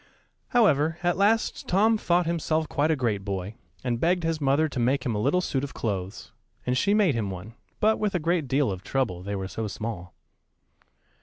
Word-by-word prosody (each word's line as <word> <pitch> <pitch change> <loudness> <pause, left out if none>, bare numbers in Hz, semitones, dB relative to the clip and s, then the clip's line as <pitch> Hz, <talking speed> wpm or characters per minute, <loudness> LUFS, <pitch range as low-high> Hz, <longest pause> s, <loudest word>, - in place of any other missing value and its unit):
However, 165 - +3
at 175 0 +2
last 210 +4 +1
Tom 215 +5 +4
thought 175 -4 +1
himself 160 -1 0
quite 145 +2 0
a 160 - +3
great 115 -7 -1
boy, 100 0 -4 0.3
and 120 -2 -1
begged 175 +4 +2
his 165 -1 -1
mother 140 +3 +3
to 140 - -5
make 125 +3 +1
him 120 - 0
a 105 - -1
little 145 +10 +2
suit 135 -6 -1
of 140 - -6
clothes, 100 -3 -4 0.3
and 125 - +1
she 200 +10 +2
made 200 -8 +4
him 110 -4 -2
one; 95 +4 -7 0.3
but 220 +1 +3
with 210 -3 0
a - - +2
great 165 -2 0
deal 135 -2 +1
of 95 -1 -5
trouble, 110 -8 -1
they 100 +2 -4
were 95 -1 -3
so 110 +3 -4
small. 100 -3 -6
140 Hz, 205 wpm, -26 LUFS, 110-175 Hz, 0.3 s, Tom